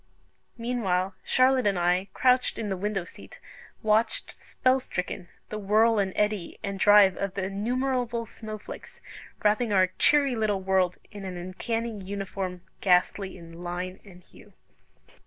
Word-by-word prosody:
Meanwhile, 195 -6 0
Charlotte 255 -2 +3
and 200 -2 +1
I, 180 +2 +2
crouched 255 0 +3
in 215 -2 -3
the 190 - -1
window 195 0 -2
seat, - - -13 0.4
watched, 220 +1 +1
spell 260 0 0
stricken, 180 -6 -5 0.2
the 215 - -4
whirl 215 +2 +3
and 195 -1 +1
eddy 210 -4 -1
and 200 -1 -4
drive 205 -2 +7
of 200 -1 -3
the 195 - -2
innumerable 240 +4 -1
snow 215 -1 -8
flakes, 210 - -10 0.4
wrapping 215 +2 +2
our 185 -2 +4
cheery 280 -3 +4
little 215 -3 +1
world 185 -1 +2
in 205 -2 -8
an 185 -2 -5
uncanny 225 +6 -3
uniform, 190 -2 -4 0.2
ghastly 190 +1 +2
in 165 0 -11
line 180 +2 -4
and 180 -3 -15
hue. - - -18
200 Hz, 145 wpm, -27 LUFS, 185-225 Hz, 0.4 s, drive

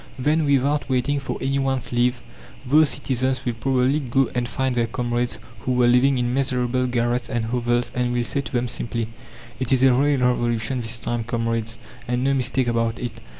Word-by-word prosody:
Then, 150 +4 +1
without 140 +1 +1
waiting 135 +3 +1
for 135 - -4
anyone's 135 -1 -1
leave, 120 0 +1 0.4
those 150 +3 +5
citizens 130 -1 -1
will 120 - 0
probably 130 +4 +1
go 135 -2 0
and 120 -1 -1
find 130 0 -1
their 120 -1 +1
comrades 120 0 -2 0.2
who 125 +5 -2
were 125 -1 +3
living 125 +3 +4
in 120 0 0
miserable 125 -1 0
garrets 120 0 0
and 120 -3 -1
hovels 120 +1 0
and 125 -1 0
will 120 0 0
say 140 - -1
to - - -9
them 125 -2 0
simply: 115 -1 -3 0.5
"It 130 -1 -2
is 130 -1 +3
a 130 -1 +6
real 140 +2 +2
Revolution 120 0 0
this 115 +1 0
time, 120 0 -2
comrades, 115 -1 -2 0.3
and 125 +1 0
no 140 +1 +2
mistake 130 0 +1
about 115 -1 0
it. 120 -2 -6
125 Hz, 190 wpm, -23 LUFS, 120-135 Hz, 0.5 s, a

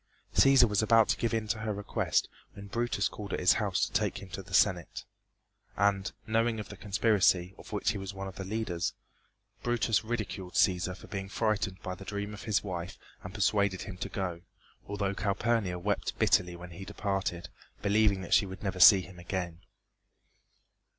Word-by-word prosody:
Cæsar 135 -3 +6
was 105 0 +1
about 110 0 +5
to - - +2
give 115 - 0
in 110 -1 -1
to 110 - 0
her 110 0 -2
request 105 0 0 0.3
when 100 - -10
Brutus 115 -1 0
called 100 -2 -7
at - - -1
his 90 - +5
house 100 -4 +1
to - - -9
take - - 0
him 100 - -9
to 95 - -6
the 95 - -15
Senate, 95 -2 +2 0.7
and, 100 0 +2
knowing 115 0 +1
of 105 - -7
the 105 - -8
conspiracy, 95 -3 +2
of - - -12
which 105 - 0
he 105 - -4
was 95 0 -5
one 95 0 -6
of 95 - -8
the 95 - -4
leaders, 95 -4 -2 0.7
Brutus 120 -2 +1
ridiculed 105 -5 -4
Cæsar 90 0 +2
for - - -13
being 95 -1 -5
frightened 105 -4 -1
by 95 - -3
the 100 - -9
dream 100 +1 -4
of 105 - -9
his 110 -2 +1
wife 90 -3 -5 0.3
and 90 - -7
persuaded 100 -1 +1
him 95 -3 -8
to - - -4
go, 90 -4 -3 0.5
although 100 -1 -1
Calpurnia 100 -1 0
wept 100 +3 -2
bitterly 90 -1 +3
when 90 0 -10
he 90 +4 -8
departed, 95 -3 -3 0.3
believing 100 -1 +3
that 90 - -3
she 100 - +5
would 95 +1 -9
never 95 -2 -3
see 95 +1 +9
him 90 -1 -12
again. 85 -1 -4
100 Hz, 190 wpm, -30 LUFS, 95-105 Hz, 0.7 s, see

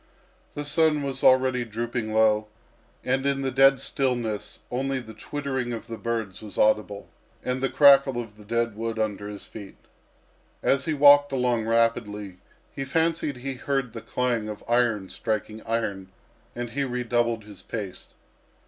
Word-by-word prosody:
The 145 - -4
sun 150 0 +2
was 135 -1 -4
already 130 -1 +4
dropping 115 0 -3
low, 110 -1 +3 0.6
and 130 +1 0
in 140 0 0
the 135 - 0
dead 135 +1 +5
stillness 115 -6 -2
only 135 +2 -1
the 110 -3 -10
twittering 130 +1 -3
of 115 -1 -6
the 115 -1 -7
birds 115 -5 -3
was 105 -2 -9
audible, 105 -1 +1 0.4
and 125 0 -1
the 135 - +1
crackle 140 -3 +6
of 115 -3 -7
the 105 - -15
dead 115 +1 -1
wood 115 +1 -3
under 105 -2 -2
his 105 -1 -7
feet. 100 -3 -10 0.9
As 135 0 +2
he 160 - 0
walked 145 0 +7
along 125 -4 0
rapidly, 105 -4 0 0.4
he 135 - -3
fancied 160 -1 0
he 135 +2 -4
heard 135 -2 -2
the 115 - -6
clang 120 -4 -1
of 105 - -7
iron 115 -5 +2
striking 110 -1 -3
iron, 100 -5 -2 0.5
and 120 -1 -4
he 140 +2 -1
redoubled 120 -3 0
his 105 -3 -10
pace. 100 -5 -7
120 Hz, 155 wpm, -26 LUFS, 110-135 Hz, 0.9 s, walked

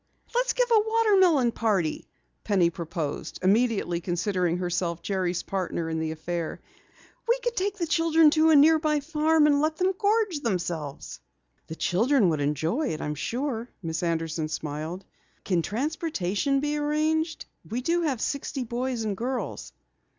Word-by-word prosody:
"Let's - - +1
give - - +1
a 450 - +7
watermelon 385 - +3
party!" 200 -9 -1 0.4
Penny 185 -5 +2
proposed, 160 -3 -5
immediately 200 -4 +2
considering 180 0 0
herself 175 -1 -2
Jerry's 185 -3 -1
partner 175 -4 -3
in 160 - -1
the 160 0 -2
affair. 160 +1 -4 0.7
"We 475 +1 +3
could 485 -1 -1
take 400 +2 -1
the 345 - -1
children 330 -1 +4
to 315 +1 +4
a 315 - +6
nearby 305 0 +4
farm 310 +1 +2
and 290 -1 +4
let 310 +1 +1
them 370 +1 +1
gorge 415 -4 +1
themselves!" 175 - -4 0.5
"The 160 - -6
children 220 - +2
would 155 -3 0
enjoy 160 - 0
it, 155 - -3
I'm 150 - -3
sure," 240 - -3
Miss 160 -1 -3
Anderson 165 -2 -1
smiled. 155 +4 -5 0.4
"Can 180 -3 +1
transportation 275 - -1
be 295 +1 -1
arranged? 310 +2 0 0.2
We 245 +3 -3
have 330 -7 +1
sixty 280 -1 -2
boys 245 0 -3
and 210 -2 -2
girls." 250 +5 -4
235 Hz, 145 wpm, -26 LUFS, -, 0.7 s, a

